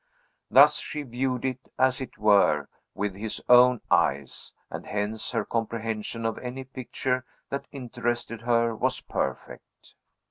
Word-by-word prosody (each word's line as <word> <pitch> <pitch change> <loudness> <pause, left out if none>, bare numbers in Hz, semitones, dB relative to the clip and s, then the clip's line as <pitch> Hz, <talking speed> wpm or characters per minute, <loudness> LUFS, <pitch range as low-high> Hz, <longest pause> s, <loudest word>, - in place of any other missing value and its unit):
Thus - - +7
she 150 - -4
viewed 125 0 -2
it, 130 -1 -1 0.2
as 130 0 +3
it 130 - -7
were, 100 -9 +4 0.3
with 105 -1 -2
his 105 +3 -4
own 125 -1 +7
eyes, 70 -1 +1 0.2
and - - -7
hence 105 +2 -2
her - - -1
comprehension 115 0 -3
of 115 - -1
any 125 +1 -5
picture 130 0 -3 0.3
that 140 - -3
interested 120 -3 -3
her 115 -1 +2
was - - 0
perfect. - - -5
120 Hz, 135 wpm, -27 LUFS, 110-130 Hz, 0.3 s, Thus